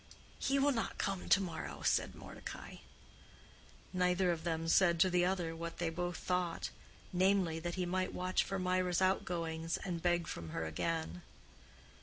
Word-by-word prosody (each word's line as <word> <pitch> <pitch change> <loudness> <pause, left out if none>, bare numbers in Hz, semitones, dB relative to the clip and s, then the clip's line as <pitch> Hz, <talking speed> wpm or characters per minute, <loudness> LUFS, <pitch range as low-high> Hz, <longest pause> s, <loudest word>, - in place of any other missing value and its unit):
"He 275 +1 +2
will 280 +1 +4
not 230 -4 -2
come 195 -2 -2
to - - +7
morrow," 185 -4 -5
said - - +2
Mordecai. - - -8 1.2
Neither 180 0 +3
of 165 -2 -3
them 165 -1 -1
said 170 0 +5
to 185 - +5
the 175 0 +4
other 180 -3 0
what 170 0 -5
they 170 -1 -1
both 175 +1 -2
thought, 180 -2 -1 0.4
namely, 185 -3 +3
that 175 +1 -3
he 185 -1 0
might 185 +1 0
watch 185 0 +1
for 195 - -3
Mirah's 180 -1 +1
outgoings 165 -3 0
and 175 -3 -4
beg 175 -1 +2
from 85 - -6
her 80 - -3
again. 90 - -2
175 Hz, 160 wpm, -35 LUFS, 165-185 Hz, 1.2 s, to